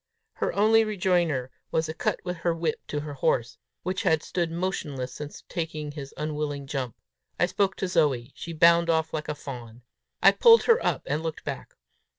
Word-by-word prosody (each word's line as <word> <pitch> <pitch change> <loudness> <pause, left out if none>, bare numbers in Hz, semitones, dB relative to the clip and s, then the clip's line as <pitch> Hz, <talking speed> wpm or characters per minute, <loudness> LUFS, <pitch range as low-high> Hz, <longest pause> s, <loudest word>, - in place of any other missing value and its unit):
Her - - 0
only 220 +2 +5
rejoinder 175 - 0 0.2
was 160 0 0
a 160 - -4
cut - - -1
with 180 -1 -3
her 170 0 0
whip 165 -2 -1
to 145 - -2
her 150 -1 -6
horse, 120 -3 0 0.2
which 185 +1 -2
had 160 -1 +2
stood 170 -2 -1
motionless 155 -7 -3
since 150 +2 -8
taking 155 -3 -4
his 140 -2 -8
unwilling 150 -2 -3
jump. 135 -4 -3 0.4
I - - +5
spoke 190 +1 0
to 190 - -2
Zoe; 145 -8 +1
she 170 - -7
bounded 170 +1 +5
off 160 -1 0
like 155 -1 -3
a 150 - -2
fawn. 120 -5 -9 0.4
I - - +7
pulled 465 -1 +7
her 465 0 +4
up, - - 0
and 150 +3 -1
looked 160 -1 -4
back. - - -6
160 Hz, 185 wpm, -27 LUFS, 145-175 Hz, 0.4 s, I